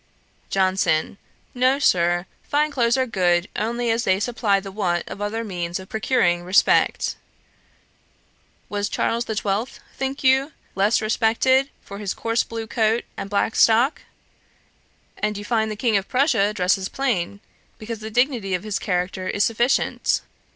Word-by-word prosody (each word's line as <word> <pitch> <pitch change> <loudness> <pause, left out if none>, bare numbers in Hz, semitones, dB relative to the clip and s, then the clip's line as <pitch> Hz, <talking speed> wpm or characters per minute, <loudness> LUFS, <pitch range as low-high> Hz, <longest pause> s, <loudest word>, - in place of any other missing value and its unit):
JOHNSON. 185 -3 +1 0.3
'No, 255 +2 +3
Sir; 175 -9 +2 0.2
fine 300 +1 0
clothes 240 -3 +2
are 260 - +2
good 180 -5 +1
only 235 +2 -1
as 230 +1 0
they 190 -3 +2
supply 215 -3 +1
the 195 0 -8
want 180 -4 -1
of 200 - -8
other 220 +2 -2
means 175 -4 -4
of 190 - -11
procuring 215 -6 +1
respect. 185 +4 +2 1.5
Was 205 0 -2
Charles 235 +1 -1
the 220 - -3
Twelfth, 210 +4 -2 0.2
think 270 +1 -4
you, 265 +3 +3 0.2
less 205 +3 +2
respected 245 +5 +2
for 200 0 -9
his 200 -3 -3
coarse 230 0 0
blue 225 -1 -6
coat 220 0 +1
and 195 - -6
black 205 +2 0
stock? 235 +6 +4 1.2
And 210 -1 -1
you 205 - -7
find 220 -2 +1
the 215 - -4
King 225 -1 +1
of 195 - -3
Prussia 250 -6 +2
dresses 190 -1 0
plain, 200 -8 -1 0.4
because 225 0 -6
the 220 0 -6
dignity 240 -5 +1
of 180 - -4
his 215 -2 -2
character 185 0 -2
is 205 - +1
sufficient.' 235 +4 +1
215 Hz, 150 wpm, -22 LUFS, 195-240 Hz, 1.5 s, stock